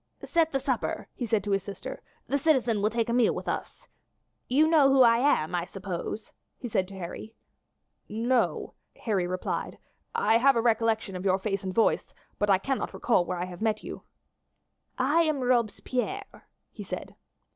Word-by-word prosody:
"Set 330 -2 +2
the 270 - 0
supper," 260 -3 -2
he 240 - -4
said 220 -3 +1
to 205 - -3
his 195 0 +2
sister; 200 +1 -7 0.2
"the 280 - 0
citizen 255 -8 +2
will 210 - +3
take 230 0 -1
a 235 - -1
meal 245 -1 +3
with - - -6
us. - - -4 0.6
You 295 +5 +4
know 310 -4 +5
who 270 -1 +6
I 230 -1 +5
am, 180 - +2
I 175 -1 0
suppose?" 195 +2 -5 0.3
he 245 - -6
said 190 -4 0
to 195 - -11
Harry. 190 +5 -7 0.7
"No," 235 +3 0 0.3
Harry 195 -6 0
replied. 185 0 -3 0.4
"I 220 +2 +3
have 270 +2 +5
a - - +3
recollection 225 -3 +1
of 180 - -5
your 190 -1 +3
face 195 0 -2
and 190 - -3
voice, 225 +4 +1 0.2
but 205 - +1
I 195 - +6
cannot 265 +7 -3
recall 205 -7 +2
where 180 +1 -3
I 175 - -2
have 180 +1 -10
met 220 -1 0
you." - - -7 1.0
"I 290 +6 +3
am 310 -4 +1
Robespierre," 250 - -1 0.2
he - - -10
said. - - -6
225 Hz, 180 wpm, -28 LUFS, 195-260 Hz, 1.0 s, who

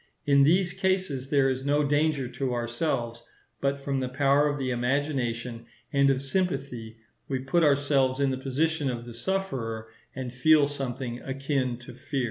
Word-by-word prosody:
In 140 -1 +5
these 175 +5 +4
cases 185 -9 -1
there 140 -2 +4
is 130 0 -1
no 145 +1 +2
danger 145 -2 +1
to 125 0 -2
ourselves; 120 -1 -2 0.4
but 140 0 0
from 135 -1 -2
the 130 -1 -2
power 140 +2 +3
of 145 0 -1
the 130 -2 -2
imagination 120 -2 -1 0.3
and 140 0 +4
of 135 0 +1
sympathy 135 -8 -2 0.3
we 135 - -1
put 135 +7 +1
ourselves 140 -2 +3
in 140 -1 +2
the 130 - -2
position 145 +2 0
of 120 -1 -4
the 120 - -8
sufferer, 115 -8 -3 0.3
and 130 -2 -5
feel 150 +4 +5
something 130 -3 -4
akin 135 -2 -1
to 120 0 -11
fear. 135 +3 -4
135 Hz, 165 wpm, -27 LUFS, 125-145 Hz, 0.4 s, In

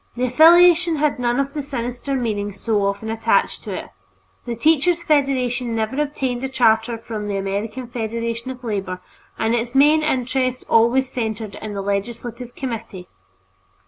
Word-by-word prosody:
The 250 - -1
affiliation 340 +5 +6
had 295 -3 0
none 240 +1 +1
of 275 0 -1
the 300 - -3
sinister 255 0 -4
meaning 210 -5 -2
so 205 +1 -1
often 200 +3 -3
attached 225 0 +1
to - - -5
it. - - -7 0.6
The 235 - -2
Teachers' 320 +7 +2
Federation 255 -6 +1
never 225 +6 -1
obtained 265 -4 -2
a 265 - -2
charter 230 -2 +2
from 220 -2 -6
the 200 -1 -2
American 205 +6 -3
Federation 230 0 -4
of 255 -1 -8
Labor, 195 -5 -3 0.4
and 225 +1 0
its 240 +1 -2
main 300 +3 +5
interest 255 -3 -1
always 235 +4 +3
centered 220 -4 -4
in 215 -1 -6
the 195 - -3
legislative 235 +4 -4
committee. 225 -8 -6
240 Hz, 155 wpm, -21 LUFS, 220-270 Hz, 0.6 s, affiliation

